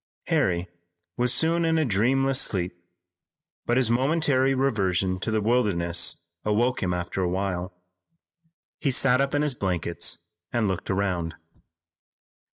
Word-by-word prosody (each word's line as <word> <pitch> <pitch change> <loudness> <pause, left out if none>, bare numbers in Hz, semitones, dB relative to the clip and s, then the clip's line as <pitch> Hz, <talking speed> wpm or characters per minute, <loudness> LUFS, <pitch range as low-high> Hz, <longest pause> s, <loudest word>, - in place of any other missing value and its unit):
Harry 90 -1 +1 0.5
was 125 0 +1
soon 165 +6 +2
in 165 0 +2
a 160 - +2
dreamless 130 +5 +2
sleep, 90 -3 -1 0.9
but 120 - +2
his 125 -3 +2
momentary 135 0 +2
reversion 95 -8 0
to 105 - -3
the 110 -1 0
wilderness 85 -8 +1 0.2
awoke 120 +4 +1
him 95 -3 0
after 90 +2 -3
a 90 - 0
while. 95 0 -2 1.1
He 140 - 0
sat 130 0 +4
up 140 +1 0
in 145 - +2
his 150 -2 +2
blankets 90 -6 -2 0.3
and 115 -3 +1
looked 95 -2 -3
around. 90 -4 -1
110 Hz, 135 wpm, -25 LUFS, 90-130 Hz, 1.1 s, sat